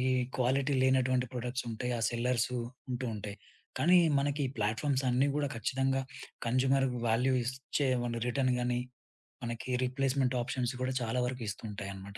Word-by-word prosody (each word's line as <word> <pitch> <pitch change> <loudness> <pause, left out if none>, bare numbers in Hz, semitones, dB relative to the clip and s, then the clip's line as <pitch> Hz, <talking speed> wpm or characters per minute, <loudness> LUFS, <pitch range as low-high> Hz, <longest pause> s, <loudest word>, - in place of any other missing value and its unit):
ఈ 125 - +1 0.3
క్వాలిటీ 135 +3 +2
లేనటువంటి 130 -1 +3
ప్రోడక్సుం‌టాయి. 125 -1 -3
ఆ - - -3
సెల్లర్సు 125 +1 0 0.4
ఉంటూ 125 +1 -2
ఉంటాయి. 105 0 -6 0.4
కానీ, 180 +2 +6 0.2
మనకి 145 +1 0
ప్లాట్‌ఫామ్స్ 130 +6 +1
అన్నీ 130 +3 +3
గూడా 145 -1 +1
ఖచ్చితంగా 135 +4 0 0.5
కన్స్యూమర్ 135 +2 +3 0.2
వాల్యూ 125 +4 +3
ఇస్‌చ్చే 130 +3 -1 0.2
మన 115 -1 -2
రిటర్న్ 130 +1 +2
గాని 125 0 0 0.7
మనకి 120 +1 -5 0.2
రీప్లేస్‌మెంట్ 130 0 +1
ఆప్షన్స్ 125 +1 -2
గూడా 130 0 0
చాలా 120 +2 0
వరకు 125 -2 -4
ఇస్తుంటాయనమాట. 100 -2 -6
125 Hz, 135 wpm, -32 LUFS, 115-135 Hz, 0.7 s, కానీ